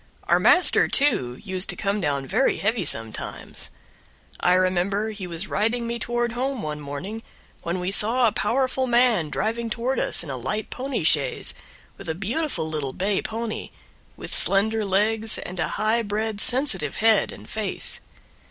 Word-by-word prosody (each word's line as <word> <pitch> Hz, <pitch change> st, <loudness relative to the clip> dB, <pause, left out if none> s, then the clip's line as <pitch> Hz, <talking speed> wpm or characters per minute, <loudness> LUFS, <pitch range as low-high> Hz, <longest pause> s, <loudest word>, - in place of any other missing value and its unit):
Our -, -, +3 dB
master, 360 Hz, -, +6 dB
too, 130 Hz, -, +1 dB
used 190 Hz, -2 st, 0 dB
to -, -, +3 dB
come 200 Hz, 0 st, -1 dB
down 140 Hz, -4 st, -1 dB
very 220 Hz, -, +1 dB
heavy 220 Hz, -2 st, 0 dB
sometimes. 115 Hz, -5 st, -3 dB, 0.7 s
I 180 Hz, -, +3 dB
remember 185 Hz, +4 st, +1 dB
he 200 Hz, -4 st, -7 dB
was 170 Hz, +3 st, -2 dB
riding 225 Hz, +4 st, 0 dB
me 235 Hz, 0 st, -3 dB
toward 240 Hz, +1 st, -1 dB
home 255 Hz, +1 st, -3 dB
one 150 Hz, -1 st, -4 dB
morning 150 Hz, +10 st, -6 dB, 0.4 s
when 170 Hz, +2 st, -3 dB
we 180 Hz, +1 st, -2 dB
saw 230 Hz, +5 st, +4 dB
a 225 Hz, -, +4 dB
powerful 260 Hz, +4 st, 0 dB
man 235 Hz, -9 st, +3 dB
driving 230 Hz, +8 st, -2 dB
toward 245 Hz, +4 st, -1 dB
us -, -, 0 dB
in 150 Hz, -, -6 dB
a 130 Hz, -, -4 dB
light 210 Hz, -, -4 dB
pony 265 Hz, +1 st, -3 dB
chaise, -, -, +2 dB, 0.5 s
with -, -, -8 dB
a 160 Hz, -, -1 dB
beautiful 200 Hz, -, -2 dB
little 150 Hz, -4 st, -3 dB
bay 195 Hz, +1 st, 0 dB
pony, 225 Hz, 0 st, -4 dB, 0.5 s
with -, -, -7 dB
slender 220 Hz, +3 st, +3 dB
legs 215 Hz, +3 st, +1 dB
and 180 Hz, 0 st, -6 dB
a -, -, +1 dB
high 220 Hz, +2 st, +2 dB
bred 215 Hz, 0 st, -3 dB
sensitive 245 Hz, -, +2 dB
head 220 Hz, -2 st, +3 dB
and -, -, -12 dB
face. 215 Hz, -2 st, -3 dB
215 Hz, 165 wpm, -24 LUFS, 180-235 Hz, 0.7 s, master